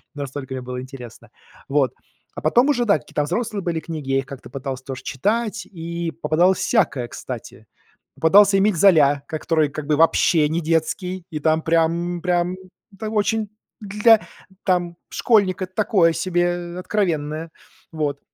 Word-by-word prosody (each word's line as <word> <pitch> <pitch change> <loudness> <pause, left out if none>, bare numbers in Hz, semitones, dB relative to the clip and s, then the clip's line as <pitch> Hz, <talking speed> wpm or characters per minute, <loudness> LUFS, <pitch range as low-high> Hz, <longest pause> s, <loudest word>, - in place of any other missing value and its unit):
настолько 140 -1 -6
мне 130 - -4
было 125 0 -5
интересно. 125 -3 -11 0.4
Вот. 135 -3 +2 0.4
А - - -6
потом 245 +3 +3
уже 245 -4 +2
да, 200 -8 +3
какие-то 150 - -3
взрослые 210 +5 -2
были 170 -2 -1
книги, 155 -5 -6
я 135 - +3
их 135 - -4
как-то 135 0 -10
пытался 135 -1 -6
тоже 130 -2 -7
читать, 215 - -1
и 170 -2 -5
попадалось 170 +4 +2
всякое, 155 - +1
кстати. 115 -3 -9 0.5
Попадался 195 +4 +5
Эмиль 200 0 +3
Золя, 150 -6 +4
ко 155 - -4
который 155 -2 +1
как 145 0 -7
бы 150 - +2
вообще 160 0 +3
не 160 +2 0
детский, 170 +3 -1
и 155 -4 -4
там 155 +1 +2
прям, 170 +2 0
прям, 175 0 0 0.4
там 215 0 -4
очень 215 0 0 0.3
для 210 +2 +3 0.4
там, 175 -2 0
школьника 200 -5 +2
такое 185 -2 +2
себе, 175 +1 -1
откровенное. 165 -5 -2 0.4
Вот. 145 -3 -2
165 Hz, 150 wpm, -22 LUFS, 145-190 Hz, 0.5 s, Попадался